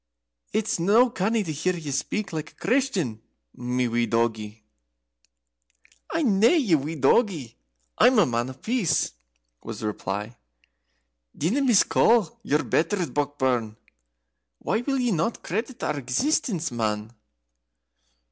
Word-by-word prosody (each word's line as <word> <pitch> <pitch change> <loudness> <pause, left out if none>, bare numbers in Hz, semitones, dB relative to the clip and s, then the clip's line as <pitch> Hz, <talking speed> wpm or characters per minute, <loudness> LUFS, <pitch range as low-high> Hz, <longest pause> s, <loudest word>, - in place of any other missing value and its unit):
It's 215 -3 -1
no 220 +8 +4
canny 220 +1 0
to 165 - -4
hear 180 +5 -1
ye 155 -4 -5
speak 205 +8 -2
like 155 0 -5
a - - -39
Christian, 200 - 0 0.3
my 125 0 -1
wee 120 0 0
doggie." 110 -1 -1 1.5
"I'm 260 -12 +1
nae 230 - +6
your 165 - +1
doggie, 150 - +1 0.4
I'm 255 -1 +6
a 210 - +6
Man 120 -1 -1
of 130 0 -12
Peace," 230 -7 +1 0.5
was 115 -2 -7
the - - -4
reply. 105 +2 -4 1.0
"Dinna 195 - +1
miscall 230 - +3
your 150 +1 0
betters, 175 +2 0
Brockburn: 130 -6 -1 0.8
why 220 - -1
will 270 +2 -1
ye 245 -2 +1
not 175 +5 -1
credit 230 +7 -4
our 150 -1 -1
existence, 165 - 0
man?" 110 -1 -2
160 Hz, 125 wpm, -25 LUFS, -, 1.5 s, nae